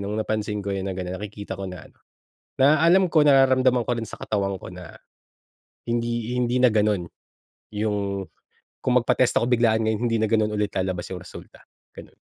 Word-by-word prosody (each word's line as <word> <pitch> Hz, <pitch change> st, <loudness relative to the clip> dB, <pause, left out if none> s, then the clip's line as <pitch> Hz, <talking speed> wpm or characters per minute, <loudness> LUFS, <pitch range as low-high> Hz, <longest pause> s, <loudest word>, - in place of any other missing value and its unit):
nung 100 Hz, -, -4 dB
napansin 110 Hz, -1 st, -2 dB
ko 100 Hz, -, -2 dB
yun 95 Hz, -, -3 dB
na 95 Hz, -, -2 dB
ganon, 90 Hz, 0 st, -4 dB
nakikita 100 Hz, -1 st, -7 dB
ko 100 Hz, -, -6 dB
na 90 Hz, -3 st, -9 dB
ano, -, -, -27 dB, 0.7 s
na 145 Hz, +3 st, +6 dB
alam 180 Hz, +2 st, +5 dB
ko 155 Hz, -, +4 dB
nararamdaman 130 Hz, -3 st, +4 dB
ko -, -, -1 dB
rin 115 Hz, -, -4 dB
sa -, -, -9 dB
katawan 100 Hz, -2 st, -1 dB
ko -, -, -8 dB
na, 90 Hz, -2 st, -11 dB, 0.9 s
hindi 120 Hz, 0 st, -2 dB
hindi 125 Hz, 0 st, +1 dB
na 125 Hz, -, +6 dB
ganun 105 Hz, -4 st, +1 dB, 0.7 s
yung 100 Hz, -2 st, -2 dB, 0.6 s
kung 125 Hz, -, +1 dB
magpa-test 125 Hz, +1 st, +2 dB
ako -, -, +1 dB
biglaan 115 Hz, -2 st, +3 dB
ngayon 110 Hz, -1 st, -2 dB
hindi 115 Hz, -, +1 dB
na -, -, +3 dB
ganun 110 Hz, -1 st, +1 dB
ulit 105 Hz, -1 st, -1 dB
lalabas 95 Hz, -2 st, -3 dB
yung 95 Hz, -, -5 dB
resulta, 85 Hz, -, -13 dB, 0.3 s
ganun. -, -, -12 dB
110 Hz, 185 wpm, -24 LUFS, 100-120 Hz, 0.9 s, na